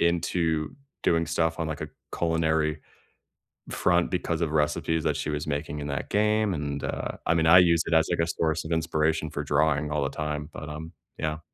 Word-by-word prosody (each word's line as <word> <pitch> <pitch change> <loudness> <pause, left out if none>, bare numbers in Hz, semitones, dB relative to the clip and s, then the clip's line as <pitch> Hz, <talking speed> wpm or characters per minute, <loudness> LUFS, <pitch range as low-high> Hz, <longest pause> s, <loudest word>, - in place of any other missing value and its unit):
into 85 -2 +1 0.3
doing 85 0 +2
stuff 80 -1 0
on, 80 - 0
like, 75 - -4
a - - -4 0.3
culinary 80 -2 +1 0.9
front 85 -1 +2
because 85 -2 -1
of 80 -2 0
recipes 80 +1 +1
that - - +1
she - - -3
was 75 -1 -2
making 75 0 -3
in 70 - -4
that 70 -2 -3
game, 105 -1 +2
and, 70 -2 -3
uh - - -4
I 80 - +3
mean, 80 -1 +2
I 90 +2 +9
use 85 -2 +4
it 85 - -1
as, 80 0 +4
like, 85 - 0
a - - -1
source 80 -1 0
of 80 - -6
inspiration 80 -1 +1
for - - -4
drawing 75 -1 +1
all 75 -2 0
the - - 0
time, 75 0 -4
but, 75 - -7
um, 80 +2 -7 0.3
yeah. 75 0 -2
80 Hz, 205 wpm, -27 LUFS, 75-85 Hz, 0.9 s, I